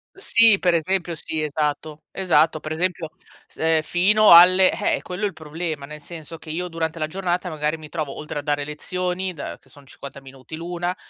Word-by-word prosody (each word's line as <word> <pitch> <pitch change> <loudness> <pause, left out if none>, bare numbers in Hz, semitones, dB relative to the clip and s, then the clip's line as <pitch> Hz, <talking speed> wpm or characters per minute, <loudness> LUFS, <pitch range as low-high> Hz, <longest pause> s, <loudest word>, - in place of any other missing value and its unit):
Sì, 230 - +4
per 175 -2 +1
esempio 170 +1 0
sì 155 0 -4
esatto, 150 +1 -3
esatto. 160 -4 +2
Per 155 0 -7
esempio, 170 -1 -2 0.4
s - - -23
ehm, 160 0 +2
fino 205 +6 +4
alle 185 +2 +8
eh, 205 - -1
quello 180 +3 -6
è - - +3
il 195 - -7
problema, 155 -2 -5
nel 150 +1 -10
senso 165 0 -10
che 160 - -13
io 180 +3 -3
durante 165 0 -3
la 155 - -1
giornata, 180 +1 -3
magari, 155 0 -2
mi 155 -1 -11
trovo, 150 -4 -5
oltre 150 -1 -5
a - - -4
dare 145 0 -1
lezioni, 180 +4 -3
da 110 - -7
che - - -26
sono 145 -1 -17
50 140 +1 -11
minuti 135 +2 -11
l'una, 175 +2 -4
160 Hz, 200 wpm, -22 LUFS, 150-180 Hz, 0.4 s, alle